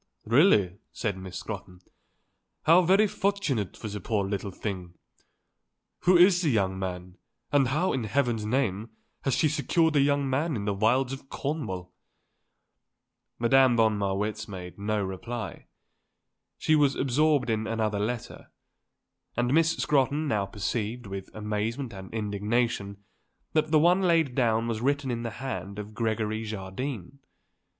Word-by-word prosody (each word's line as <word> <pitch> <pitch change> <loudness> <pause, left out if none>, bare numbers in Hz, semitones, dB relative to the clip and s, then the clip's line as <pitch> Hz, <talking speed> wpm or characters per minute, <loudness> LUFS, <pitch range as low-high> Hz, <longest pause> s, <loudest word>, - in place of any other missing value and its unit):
"Really," 110 - +4
said 105 -4 -2
Miss 95 -1 -7
Scrotton, 90 0 -7 0.8
"how 165 +3 +6
very 190 +4 +4
fortunate 195 - -1
for - - -6
the 105 0 -5
poor 105 +1 0
little 100 0 -3
thing. 90 -3 -6 1.1
Who 180 0 +6
is 180 0 +6
the 165 - +2
young 95 -6 +1
man, 90 -1 -5 0.3
and 140 -3 +4
how, 155 +9 +1
in 125 -4 -1
heaven's 120 -1 0
name, 110 -2 -1 0.4
has 135 - +2
she 155 - +3
secured 155 +2 +1
a 145 - +5
young 140 0 +2
man 145 +4 0
in 100 -3 -3
the 105 - 0
wilds 125 +6 +2
of 135 0 -9
Cornwall?" 110 - -4 1.4
Madame 125 +1 +4
von 110 -1 +4
Marwitz 105 +2 -2
made 90 -2 -8
no 105 0 0
reply. 100 +2 -6 0.9
She 155 - +2
was 145 -3 +3
absorbed 140 -1 +2
in 110 0 -1
another 110 -2 -1
letter. 115 +3 -4 0.9
And 120 +2 +1
Miss 165 +1 +3
Scrotton 145 +2 +1
now 105 -6 0
perceived, 110 +4 -3
with 95 -1 -6
amazement 110 +4 -3
and 95 -1 -9
indignation, 105 -1 -1 0.5
that 155 0 +2
the 155 - +4
one 175 +5 +4
laid 165 -7 +3
down 115 -2 +1
was 115 -2 -2
written 140 0 0
in 120 -1 -2
the 115 - -3 0.2
hand 100 -6 -5
of 105 +1 -7
Gregory 110 -1 -1
Jardine. 110 +4 -5
115 Hz, 145 wpm, -27 LUFS, 105-140 Hz, 1.4 s, how